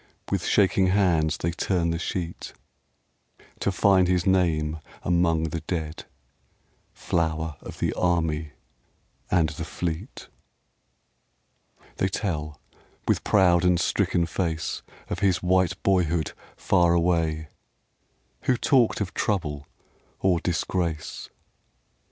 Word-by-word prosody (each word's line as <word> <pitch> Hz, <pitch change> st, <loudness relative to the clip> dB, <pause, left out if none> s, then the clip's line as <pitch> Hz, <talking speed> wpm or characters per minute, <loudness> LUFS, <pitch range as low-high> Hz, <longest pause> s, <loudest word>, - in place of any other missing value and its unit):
With -, -, 0 dB
shaking 95 Hz, -2 st, +3 dB
hands 85 Hz, -6 st, +2 dB
they 85 Hz, -, -1 dB
turn 85 Hz, 0 st, 0 dB
the 85 Hz, -, -2 dB
sheet 85 Hz, -1 st, -4 dB, 1.1 s
To 100 Hz, -, 0 dB
find 95 Hz, -1 st, +4 dB
his 90 Hz, -1 st, +1 dB
name 80 Hz, -5 st, +1 dB, 0.2 s
among 85 Hz, -2 st, +2 dB
the 80 Hz, -, -3 dB
dead, 80 Hz, -3 st, -4 dB, 0.9 s
Flower 80 Hz, -2 st, -1 dB
of -, -, -9 dB
the -, -, 0 dB
Army 80 Hz, -4 st, 0 dB, 0.8 s
and 85 Hz, -4 st, +3 dB
the 80 Hz, +2 st, -6 dB
Fleet. 85 Hz, -, -5 dB, 1.7 s
They 95 Hz, -, +1 dB
tell, 80 Hz, -7 st, -3 dB, 0.5 s
with -, -, +1 dB
proud 90 Hz, -3 st, +4 dB
and 90 Hz, -1 st, +3 dB
stricken 85 Hz, -, +1 dB
face, 85 Hz, -1 st, -2 dB, 0.3 s
Of -, -, -4 dB
his 95 Hz, -3 st, +1 dB
white 95 Hz, 0 st, +2 dB
boyhood 85 Hz, -4 st, +1 dB, 0.3 s
far 85 Hz, -1 st, +3 dB
away 80 Hz, -3 st, +1 dB, 1.0 s
Who 125 Hz, -, +3 dB
talked 120 Hz, -3 st, +3 dB
of 95 Hz, -, -3 dB
trouble 75 Hz, -8 st, -2 dB, 0.5 s
or 90 Hz, -3 st, +2 dB
disgrace 85 Hz, -2 st, -2 dB
85 Hz, 110 wpm, -25 LUFS, 80-95 Hz, 1.7 s, find